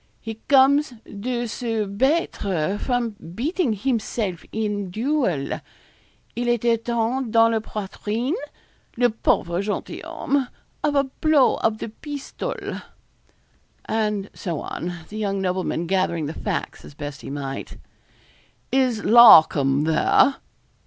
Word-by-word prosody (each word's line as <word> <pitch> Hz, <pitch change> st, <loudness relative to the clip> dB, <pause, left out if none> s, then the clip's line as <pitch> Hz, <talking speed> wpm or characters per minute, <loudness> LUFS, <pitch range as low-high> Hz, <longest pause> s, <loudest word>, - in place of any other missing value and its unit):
He 225 Hz, -1 st, -7 dB
comes 280 Hz, +1 st, +6 dB, 0.2 s
de 240 Hz, +4 st, -3 dB
se 225 Hz, -2 st, -2 dB
battre 200 Hz, -, 0 dB
from 245 Hz, -3 st, -1 dB, 0.2 s
beating 295 Hz, -, 0 dB
himself 210 Hz, -5 st, -2 dB
in 205 Hz, -3 st, -2 dB
duel 220 Hz, -, -1 dB, 0.7 s
il 240 Hz, 0 st, -1 dB
a 240 Hz, -, +3 dB
été 235 Hz, +1 st, +2 dB
atteint 235 Hz, +2 st, -1 dB
dans 230 Hz, 0 st, +5 dB
la 225 Hz, -, +1 dB
poitrine 215 Hz, -, -3 dB, 0.6 s
le 245 Hz, -1 st, +3 dB
pauvre 175 Hz, -5 st, 0 dB
gentil 205 Hz, +1 st, -4 dB
homme! 275 Hz, -2 st, -1 dB, 0.4 s
of 295 Hz, -1 st, +1 dB
a 280 Hz, -, +4 dB
blow 285 Hz, +1 st, +2 dB
of 220 Hz, -1 st, 0 dB
the 220 Hz, -, -5 dB
pistol.' 290 Hz, -, -6 dB, 1.0 s
And 210 Hz, -2 st, -1 dB
so 170 Hz, -6 st, -4 dB
on, 175 Hz, -, -4 dB, 0.2 s
the 215 Hz, -, -7 dB
young 200 Hz, -2 st, -1 dB
nobleman 185 Hz, -2 st, -1 dB
gathering 170 Hz, -3 st, 0 dB
the 150 Hz, -, -4 dB
facts -, -, -4 dB
as 145 Hz, -, -13 dB
best 145 Hz, -2 st, -7 dB
he -, -, -8 dB
might. 135 Hz, -1 st, -5 dB, 0.9 s
'Is 255 Hz, -5 st, +1 dB
Larcom 155 Hz, -, +7 dB
there?' 160 Hz, -, +3 dB
220 Hz, 125 wpm, -23 LUFS, 190-250 Hz, 1.0 s, Larcom